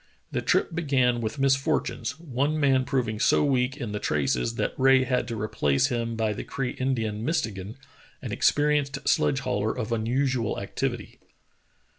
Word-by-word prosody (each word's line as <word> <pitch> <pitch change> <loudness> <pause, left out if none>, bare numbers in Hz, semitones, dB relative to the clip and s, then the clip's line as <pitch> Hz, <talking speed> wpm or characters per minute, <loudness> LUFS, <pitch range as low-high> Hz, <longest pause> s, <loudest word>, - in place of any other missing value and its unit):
The - - -1
trip - - +1
began 130 -7 +1
with 110 +5 -3
misfortunes, 135 -2 0
one 150 0 -1
man 135 -3 +3
proving 125 -6 -1
so - - +3
weak 130 -1 +1
in 120 -7 -5
the 105 - -3
traces 75 - 0
that - - -1
Rae 135 0 +5
had 125 -2 0
to 115 -3 -4
replace 75 -9 +1
him 115 -1 -2
by 110 -1 0
the - - -5
Cree 135 -2 -3
Indian, 115 -5 -2
Mistegan, 110 - -2 0.4
an - - -6
experienced 145 -1 +1
sledge 135 -1 +2
hauler 105 +1 -1
of 115 -2 -3
unusual 120 +1 0
activity. 120 +3 -4
125 Hz, 155 wpm, -26 LUFS, 110-135 Hz, 0.4 s, Rae